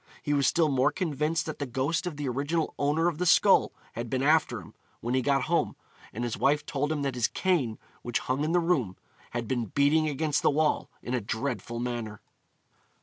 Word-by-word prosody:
He 145 - 0
was 140 -2 +3
still 165 -2 +3
more 135 +1 +3
convinced 155 0 -1
that 155 - -6
the 145 - -2
ghost 140 +8 -1
of 160 -5 -5
the 145 -2 -3
original 145 +6 -1
owner 150 +4 +2
of 170 -2 -1
the 180 - 0
skull - - +5 0.2
had 115 0 -5
been 130 +2 -1
after 150 -6 +3
him, 85 - -13 0.3
when 120 +2 -3
he 130 - +2
got 140 +1 +2
home, 170 +1 0 0.4
and 120 - -4
his 120 -2 -2
wife 145 +1 +2
told 145 +2 -1
him 150 -2 -1
that 135 -1 -1
his 120 -2 +1
cane, 150 - 0 0.2
which 120 -1 -1
hung 130 +3 -1
in 155 - 0
the 175 - +4
room, 140 - 0 0.3
had 120 -1 -4
been 120 -1 -1
beating 145 +7 +2
against 150 +1 0
the - - +4
wall 150 +1 +1
in 120 - -4
a 125 - 0
dreadful 115 +1 -3
manner. 120 -3 -4
140 Hz, 210 wpm, -28 LUFS, 120-155 Hz, 0.4 s, skull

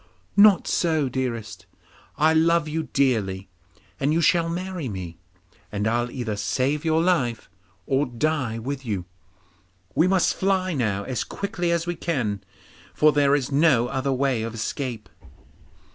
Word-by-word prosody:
'Not 200 -2 +6
so, 160 -5 +1
dearest. 125 -4 -4 0.5
I 155 +1 +4
love 165 0 +3
you 155 0 -3
dearly, 100 -9 0 0.5
and 140 +2 +1
you 160 - +2
shall 170 0 +3
marry 180 -4 -4
me, 90 -4 -7 0.5
and 105 +1 -1
I'll 120 +2 0
either 120 -4 -4
save 135 +7 -1
your 160 0 +2
life 125 - 0 0.3
or 135 +2 +1
die 130 -2 -1
with 135 +4 -5
you. 100 -7 -3 0.9
We 165 - +3
must 185 -1 +3
fly 190 -1 0
now 105 -8 -1
as 125 +2 -2
quickly 180 -3 -3
as 170 -1 +1
we 175 - -2
can, 125 - -2 0.5
for 155 0 +5
there 145 -1 +3
is 140 -1 -2
no 135 -5 +3
other 135 +1 -1
way 130 -3 +1
of 115 +1 -4
escape. 120 +1 -4
140 Hz, 145 wpm, -24 LUFS, 115-165 Hz, 0.9 s, Not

